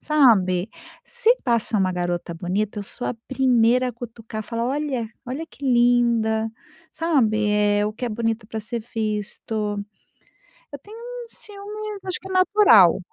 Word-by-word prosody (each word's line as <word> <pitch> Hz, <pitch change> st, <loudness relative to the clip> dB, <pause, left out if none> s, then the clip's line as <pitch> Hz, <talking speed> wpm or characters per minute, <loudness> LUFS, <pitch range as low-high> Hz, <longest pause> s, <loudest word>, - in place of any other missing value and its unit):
sabe. 215 Hz, -10 st, +3 dB, 0.3 s
Se 485 Hz, 0 st, +2 dB
passa 235 Hz, -2 st, +1 dB
uma 190 Hz, -2 st, +1 dB
garota 175 Hz, -1 st, -2 dB
bonita, 195 Hz, +5 st, -2 dB
eu 205 Hz, -, -3 dB
sou 245 Hz, -, -2 dB
a -, -, -1 dB
primeira 250 Hz, -1 st, +3 dB
a -, -, -5 dB
cutucar, 225 Hz, -2 st, -7 dB
falar: 230 Hz, +1 st, -3 dB
"Olha, 270 Hz, -3 st, -1 dB, 0.2 s
olha 265 Hz, +6 st, -4 dB
que -, -, -20 dB
linda", 235 Hz, -3 st, +3 dB, 0.4 s
sabe, 230 Hz, -11 st, +1 dB
eh, 205 Hz, 0 st, +2 dB
o 210 Hz, -, -2 dB
que 245 Hz, +3 st, -4 dB
é -, -, -1 dB
bonito 225 Hz, 0 st, -2 dB
para 220 Hz, 0 st, -5 dB
ser 220 Hz, +2 st, -4 dB
visto. 215 Hz, -1 st, -3 dB, 0.9 s
Eu 285 Hz, -, -6 dB
tenho 425 Hz, +2 st, -12 dB
um 485 Hz, 0 st, -8 dB
ciúmes 420 Hz, -1 st, -8 dB
acho 370 Hz, -, -3 dB
que 385 Hz, -, -10 dB
é -, -, -6 dB
natural. 370 Hz, -, +6 dB
230 Hz, 155 wpm, -23 LUFS, 210-285 Hz, 0.9 s, natural